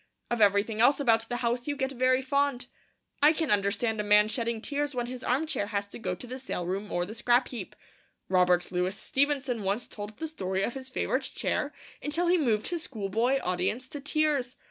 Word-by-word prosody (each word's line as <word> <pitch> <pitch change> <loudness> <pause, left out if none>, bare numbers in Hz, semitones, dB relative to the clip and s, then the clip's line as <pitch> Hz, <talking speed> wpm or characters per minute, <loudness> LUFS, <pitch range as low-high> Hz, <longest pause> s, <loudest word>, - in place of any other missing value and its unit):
Of 240 -2 0
everything 205 +2 +3
else 270 +5 +5
about 225 -4 +2
the 245 - -1
house 240 +2 0
you 290 - -1
get 265 -1 -1
very 255 0 +2
fond. 280 -1 0 0.6
I 295 +2 +8
can 320 -4 -1
understand 205 +2 +1
a - - -3
man 210 +1 +5
shedding 230 -1 -1
tears 290 +3 -2
when 245 -1 -1
his 250 +1 -7
arm 265 +6 +1
chair 205 -10 -2
has 200 -1 -1
to - - -9
go 185 -5 -2
to 245 - -10
the 255 +2 -7
sale 250 -9 -4
room 195 +3 -3
or 175 0 0
the 210 - -8
scrap 240 +2 +2
heap. 225 -7 -7 0.5
Robert 180 -1 +3
Louis 180 +2 -1
Stevenson 270 -1 0
once 200 +4 -1
told 210 0 -8
the 320 - -3
story 190 -10 -2
of 235 - -1
his 265 -1 -7
favourite - - -1
chair - - 0 0.3
until 310 +4 -1
he 350 +1 +4
moved 220 -7 +1
his 345 -2 -2
schoolboy 230 - 0
audience 185 +8 -1
to 290 - -6
tears! 290 -3 0
240 Hz, 210 wpm, -28 LUFS, 205-270 Hz, 0.6 s, I